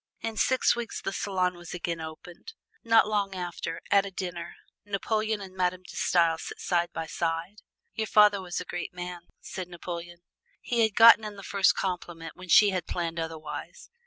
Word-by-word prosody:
In 225 -1 -3
six 260 +3 +3
weeks 235 -1 -4
the 195 - -4
salon 185 -3 0
was 175 0 -8
again 170 -1 -3
opened. 165 - -9 0.3
Not 225 -2 +5
long 200 -2 0
after, 175 -2 -5
at 200 -1 +6
a 200 - -5
dinner, 175 -2 -6 0.3
Napoleon 215 +1 -1
and 190 -1 -10
Madame 185 0 0
De - - -12
Stael 165 -2 +2
sat - - -7
side 175 -1 0
by 165 -1 -4
side. 165 +5 -3 0.3
"Your 220 -1 -2
father 210 -2 +5
was 180 -2 -4
a 180 - -6
great 175 0 -5
man," 175 -1 -7
said 185 -2 -6
Napoleon. 175 0 -7 0.4
He 240 - -2
had 220 -3 +2
gotten 230 -1 +9
in 210 -1 -6
the 195 - -10
first 200 -1 +3
compliment 175 -3 -4
when 185 0 -12
she 205 +3 +7
had 185 -3 -3
planned 170 -1 -3
otherwise. 160 -2 -6
180 Hz, 185 wpm, -28 LUFS, 170-205 Hz, 0.4 s, gotten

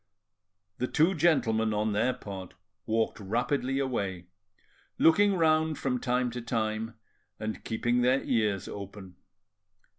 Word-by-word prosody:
The 125 - 0
two 165 +8 +3
gentlemen 115 - +2
on 105 0 0
their 110 +5 +2
part 95 -7 -8 0.3
walked 110 0 0
rapidly 125 +6 -1
away, 100 -10 -2 0.7
looking 200 +5 +5
round 160 -2 +2
from 125 -2 -1
time 125 0 0
to 120 +1 -5
time, 115 -1 -2 0.4
and 110 0 -4
keeping 120 +2 0
their 130 +2 +3
ears 105 -5 0
open. 100 -2 -9
115 Hz, 120 wpm, -29 LUFS, 105-135 Hz, 0.7 s, looking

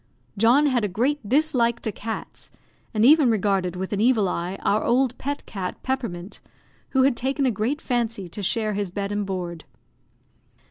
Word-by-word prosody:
John 235 +8 +4
had 255 -5 +2
a - - +2
great 240 +4 -1
dislike 250 -5 +2
to 220 - -2
cats, 220 +3 -7 0.4
and 215 0 +2
even 295 -1 +6
regarded 195 -4 +1
with 190 +2 -4
an 205 - 0
evil 225 -4 +3
eye 180 +2 -3
our 210 +2 +2
old 250 0 +2
pet 285 +1 -4
cat, 185 -3 -5
Peppermint, 225 -8 -4 0.5
who 265 -1 +3
had 270 -2 +3
taken 270 +3 -1
a 255 - +3
great 230 +8 -1
fancy 230 -6 -1
to 175 +5 -7
share 215 +2 0
his 200 -1 -2
bed 200 +2 -4
and 205 -1 -2
board. 175 -4 -4
220 Hz, 175 wpm, -24 LUFS, 195-255 Hz, 0.5 s, even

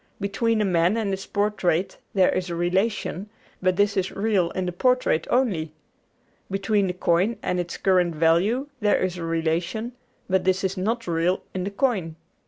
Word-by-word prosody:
Between 215 +2 0
a - - +2
man 180 +2 +2
and 215 -3 -1
his 195 0 -4
portrait 200 -4 0 0.2
there 190 -2 +4
is 180 -1 -2
a 170 - -3
relation, 190 +3 -1 0.3
but 185 -1 +2
this 205 +2 +2
is 190 -1 0
real 195 -4 +1
in 185 - -2
the 180 - -2
portrait 250 -2 +1
only. 185 -12 +1 0.8
Between 195 +1 +1
the 180 - -2
coin 180 +5 +1
and 180 - 0
its 175 -1 -4
current 180 -3 +2
value 175 - +2
there 210 -2 +3
is 185 -1 -1
a - - -4
relation, 165 +7 -1 0.4
but 190 -1 +1
this 185 +1 +1
is 190 0 -1
not 225 +5 -1
real 170 +2 0
in 185 -1 -3
the - - -1
coin. 200 -7 -1
190 Hz, 180 wpm, -24 LUFS, 175-210 Hz, 0.8 s, there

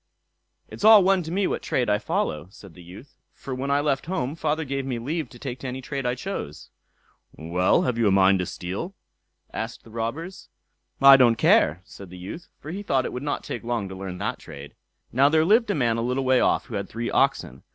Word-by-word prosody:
"It's - - -10
all 215 -2 +8
one 190 0 +3
to 165 -1 -7
me 195 +2 0
what - - -2
trade 125 - -1
I 105 0 +2
follow", 75 -5 -2
said 100 -2 -15
the 90 - -14
youth; 90 +11 -14 0.2
"for 135 - -7
when 130 +2 -3
I 140 +1 +2
left 145 -1 -1
home, 140 -7 -2
father 155 -1 -1
gave 135 0 -3
me 130 -2 -3
leave 150 +7 -3
to 120 - -14
take 125 0 -6
to 135 - -6
any 130 +1 -5
trade 135 0 -4
I 125 - 0
chose." 125 - -6 0.6
"Well, 85 +3 +1
have 125 -2 -1
you 115 - +3
a - - +3
mind 95 0 +4
to 90 - -2
steal?" 100 - -6 0.6
asked 115 +1 -5
the 115 - -16
robbers. 150 - -5 0.5
"I 135 0 +9
don't 120 -3 +5
care", 90 -6 +3
said 100 -2 -12
the 90 - -11
youth, 100 - -8
for 155 - -9
he 195 +4 -5
thought 135 -10 0
it - - -5
would 125 - -5
not 145 0 -3
take 120 - -6
long 115 -4 -2
to 95 - -8
learn 95 -1 -6
that - - -3
trade. 70 +1 -11 0.4
Now 135 +4 +4
there 155 +1 +3
lived 220 +5 +3
a 205 - +1
man 120 -4 +1
a - - -1
little 125 +3 -1
way 130 -1 +4
off - - +2
who - - -11
had 100 -2 -4
three 115 +1 -4
oxen. - - 0
125 Hz, 235 wpm, -24 LUFS, 100-150 Hz, 0.6 s, I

